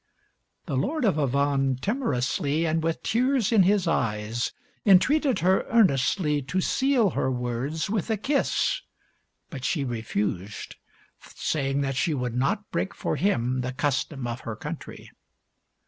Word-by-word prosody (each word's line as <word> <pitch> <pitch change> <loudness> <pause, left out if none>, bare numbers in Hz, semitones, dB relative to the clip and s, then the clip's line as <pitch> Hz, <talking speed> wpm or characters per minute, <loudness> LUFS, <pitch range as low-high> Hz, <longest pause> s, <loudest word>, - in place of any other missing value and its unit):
The - - -3
Lord 265 - 0
of 185 -8 +2
Avannes 140 -1 +1
timorously 155 - 0
and 160 0 +1
with 165 0 -2
tears 250 -1 +1
in 220 -4 +6
his 190 -1 +3
eyes 115 -5 -1 0.3
entreated 260 +8 +4
her 185 +2 +3
earnestly 150 - +3
to 140 +8 -2
seal 250 0 +2
her 130 - 0
words 125 +5 -2
with 205 0 -2
a 220 - +1
kiss, 275 +7 0 0.7
but 135 -5 -7
she 150 -2 0
refused, 105 -4 -3 0.6
saying 140 -2 -1
that 135 -1 -1
she 155 +2 +1
would 125 -3 -2
not 200 - -1
break 195 - -2
for - - -2
him 130 -9 +1
the 125 0 -3
custom 135 0 -1
of 120 +1 -3
her 115 -4 -6
country. - - -8
150 Hz, 140 wpm, -26 LUFS, 130-200 Hz, 0.7 s, in